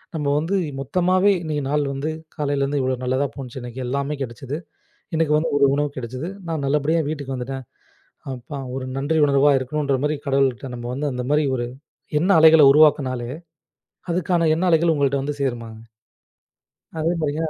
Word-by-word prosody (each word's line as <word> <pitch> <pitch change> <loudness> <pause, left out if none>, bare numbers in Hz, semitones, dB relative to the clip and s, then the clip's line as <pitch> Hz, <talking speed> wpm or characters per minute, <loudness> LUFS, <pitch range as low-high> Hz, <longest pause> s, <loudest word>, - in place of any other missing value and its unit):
நம்ப 150 -2 -2
வந்து 165 +6 0 0.2
மொத்தமாவே 185 +7 +2
இன்னைக்கு 150 -3 -2
நாள் 150 0 +1
வந்து 140 +3 -3 0.3
காலையில 145 -2 0
இருந்து 140 +1 0
இவ்ளோ 130 0 0
நல்லதா 130 +3 +1
போனுச்சு. 130 -2 -7
இன்னைக்கு 120 +1 -7
எல்லாமே 140 +3 -2
கிடைச்சுது. 135 +3 -5 0.6
இன்னைக்கு 160 -2 +2
வந்து 160 +2 0
ஒரு 140 - +5
உணவு 145 0 0
கிடைச்சுது. 130 +6 -5 0.2
நான் 160 -4 -2
நல்லபடியா 150 +3 +1
வீட்டுக்கு 140 -3 -4
வந்துட்டேன். 130 +1 -5 0.7
அப்பா 130 +3 -7 0.2
ஒரு 130 -1 -4
நன்றி 145 +4 0
உணர்வா 140 0 +4
இருக்கணுன்ற 140 +1 -1
மாதிரி 150 0 0
கடவுள்ட்ட 135 -1 +1
நம்ப 120 0 -6
வந்து 145 +3 -2
அந்த 125 0 -3
மாதிரி 150 0 +3
ஒரு 120 - -2 0.5
எண்ண 180 +5 0
அலைகள 160 -1 +8
உருவாக்கினாலே 135 -5 +3 0.8
அதுக்கான 170 -1 +1
எண்ண 180 - -1
அலைகள் 165 0 +4
உங்கள்ட்ட 140 -2 +1
வந்து 145 0 -4
சேருமாங்க. 115 -4 -4 1.2
அதே 165 +3 +1
மாதிரி 145 -1 -1
140 Hz, 160 wpm, -22 LUFS, 130-155 Hz, 1.2 s, அலைகள